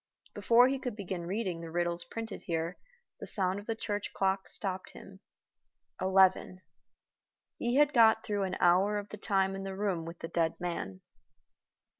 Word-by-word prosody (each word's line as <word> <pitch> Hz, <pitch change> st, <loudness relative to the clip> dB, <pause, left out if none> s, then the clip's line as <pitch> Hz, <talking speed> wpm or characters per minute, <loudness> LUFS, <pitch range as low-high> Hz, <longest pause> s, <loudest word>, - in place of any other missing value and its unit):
Before 240 Hz, +2 st, +5 dB
he 270 Hz, 0 st, -1 dB
could 250 Hz, -4 st, -4 dB
begin 185 Hz, -4 st, -5 dB
reading 185 Hz, -3 st, -2 dB
the 165 Hz, -, -7 dB
riddles 175 Hz, +1 st, -1 dB
printed 225 Hz, -1 st, -6 dB
here 165 Hz, +1 st, -2 dB, 0.4 s
the -, -, -7 dB
sound 190 Hz, 0 st, +1 dB
of 205 Hz, -, -12 dB
the 225 Hz, -, -1 dB
church 205 Hz, -2 st, -4 dB
clock 195 Hz, 0 st, 0 dB
stopped 190 Hz, -3 st, -4 dB
him. 195 Hz, 0 st, -13 dB, 0.8 s
Eleven. 190 Hz, -1 st, +3 dB, 1.0 s
He 240 Hz, +1 st, 0 dB
had 295 Hz, +1 st, +4 dB
got 225 Hz, -2 st, +5 dB
through 205 Hz, -2 st, -1 dB
an 185 Hz, -1 st, -3 dB
hour 190 Hz, +4 st, +4 dB
of 205 Hz, 0 st, -5 dB
the 210 Hz, -, -8 dB
time 195 Hz, -1 st, +1 dB
in 195 Hz, -, -5 dB
the 195 Hz, 0 st, -5 dB
room 190 Hz, -5 st, -1 dB
with 165 Hz, +1 st, -8 dB
the 165 Hz, -, -6 dB
dead 165 Hz, -1 st, 0 dB
man. 100 Hz, -, -4 dB
190 Hz, 170 wpm, -31 LUFS, 175-210 Hz, 1.0 s, Before